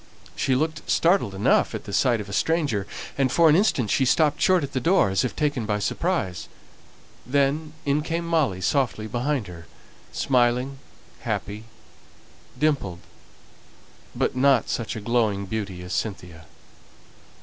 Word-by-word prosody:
She 130 - +1
looked 155 +3 -2
startled 170 - +2
at 95 - +1
the - - -8
sight 120 -3 +2
of 105 - -6
a 100 - -8
stranger, 140 -10 0 0.3
and 130 -2 +2
for 165 +2 +5
an 150 - +5
instant 160 - +2
she 135 - +2
stopped 150 +3 +2
short 185 -4 +4
at 140 +1 -5
the 130 - 0
door, 165 - +3
as 95 - +1
if 125 - -3
taken 145 -7 -1
by 105 -1 0
surprise. 105 - -2 0.8
Then 145 +3 0
in 145 +1 +1
came 165 +2 -3
Molly 150 - 0
softly 120 -1 0
behind 120 +3 -1
her, 85 -2 -11 0.4
smiling, 125 +1 +1 0.4
happy, 105 +2 -4 0.9
dimpled; 135 - 0 1.1
but - - 0
not 130 -2 +3
such 115 -3 -3
a 110 - -5
glowing 110 -3 0
beauty 95 -3 -5
as 90 - -6
Cynthia. 90 -6 -5
125 Hz, 145 wpm, -24 LUFS, 100-150 Hz, 1.1 s, for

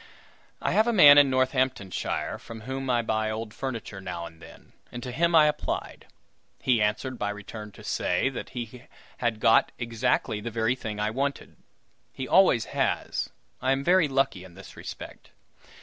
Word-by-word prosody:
I - - +1
have 220 +2 +3
a 235 - +2
man 145 -8 +9
in 140 -1 +5
Northamptonshire 130 -6 -1
from 115 -1 -10
whom 135 +2 -4
I 120 -1 +2
buy 110 -1 0
old 110 0 -5
furniture 115 -7 -5
now 90 -2 -5
and 80 -1 -13
then, - - -15 0.2
and 120 0 -7
to 125 - -5
him 170 +6 +2
I 155 -1 +8
applied. 150 0 -3 0.5
He 120 -4 +2
answered 115 +5 -1
by 105 - -1
return 105 +1 -8
to - - -14
say 90 +8 0
that 135 - -7
he 120 +2 -7 0.3
had 120 -3 -1
got 115 0 +4
exactly 115 -2 -1
the 120 - -4
very 115 +1 +1
thing 110 -4 -6
I 105 +1 0
wanted. 140 +4 -3 0.6
(He 130 - -6
always 185 - +5
has. - - -1 0.3
I 130 +1 +2
am 135 +1 -2
very 180 0 +4
lucky 135 -9 0
in 90 -2 -14
this 95 0 -12
respect.) - - -9
120 Hz, 175 wpm, -27 LUFS, 105-135 Hz, 0.6 s, man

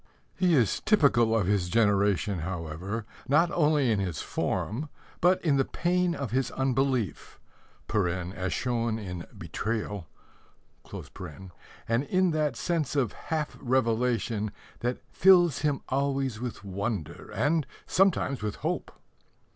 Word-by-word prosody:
He 180 -3 +3
is 120 -7 +2
typical 120 - +4
of 105 - +1
his 95 -2 +1
generation, 100 -2 +2
however, 90 +5 -4 0.2
not 165 +6 +4
only 150 -6 +3
in 105 - +2
his 90 -5 -2
form, 135 +9 -2 0.3
but 180 +2 +4
in 145 -4 +4
the 135 - +4
pain 175 +3 0
of 135 -9 -4
his 130 +2 +1
unbelief 130 -4 -1 0.5
(as 90 -1 -1
shown 115 -3 0
in 90 -5 -6
Betrayal), 105 -5 -3 1.8
and 115 +3 +2
in 185 +2 +2
that 150 -4 0
sense 155 0 -1
of 130 -7 +1
half 155 -2 -3
revelation 115 -3 +1 0.3
that 125 +1 -2
fills 175 -5 +5
him 145 -2 0
always 135 -3 0
with 125 -4 -5
wonder 100 -2 -4
and 155 0 +1 0.2
sometimes 180 - +2
with 105 -1 -2
hope. - - -3
120 Hz, 125 wpm, -28 LUFS, 105-150 Hz, 1.8 s, fills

